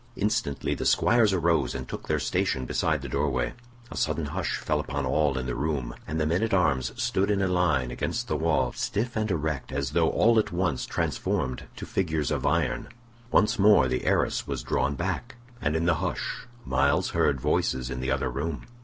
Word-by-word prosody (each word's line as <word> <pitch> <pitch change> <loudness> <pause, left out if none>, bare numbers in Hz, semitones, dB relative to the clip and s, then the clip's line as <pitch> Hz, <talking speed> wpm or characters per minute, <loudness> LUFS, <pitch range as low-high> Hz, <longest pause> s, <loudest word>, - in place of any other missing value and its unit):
Instantly 105 -9 -1
the - - -4
squires 115 -3 +4
arose 85 -4 +1
and - - -5
took - - -7
their - - +1
station 65 -1 0
beside - - 0
the - - -4
door 75 +1 0
way. 65 -2 -1 0.4
A - - -7
sudden 80 0 0
hush 70 - -2
fell - - -1
upon 70 -1 -3
all 70 0 +1
in 65 - -2
the 60 - -2
room, 70 -3 -2
and 80 +3 -2
the 75 - +1
men 85 +5 +1
at 110 -3 +1
arms 70 -9 +2
stood 95 +2 +1
in 100 -1 +2
a 95 - +2
line 80 -9 +1
against - - -2
the 75 - -1
wall, 80 +2 +1
stiff 120 +4 -2
and 110 -1 0
erect 75 -6 -2
as 70 +1 -2
though 80 +1 +3
all 115 0 +4
at 110 - -1
once 85 -6 -1
transformed 65 -1 -1
to - - -7
figures 80 -5 -1
of - - 0
iron. - - 0 0.4
Once 105 -4 +3
more 100 -8 +6
the 65 0 -2
arras - - +1
was 70 -4 -3
drawn 70 - 0
back, 120 - -3 0.3
and 75 0 0
in 80 +1 +1
the 85 - +4
hush - - -3 0.2
Myles 70 +1 +2
heard 70 - +2
voices 65 0 0
in 65 - -4
the 65 +1 -2
other 65 -1 0
room. 70 +4 -3
75 Hz, 205 wpm, -27 LUFS, 65-90 Hz, 0.4 s, more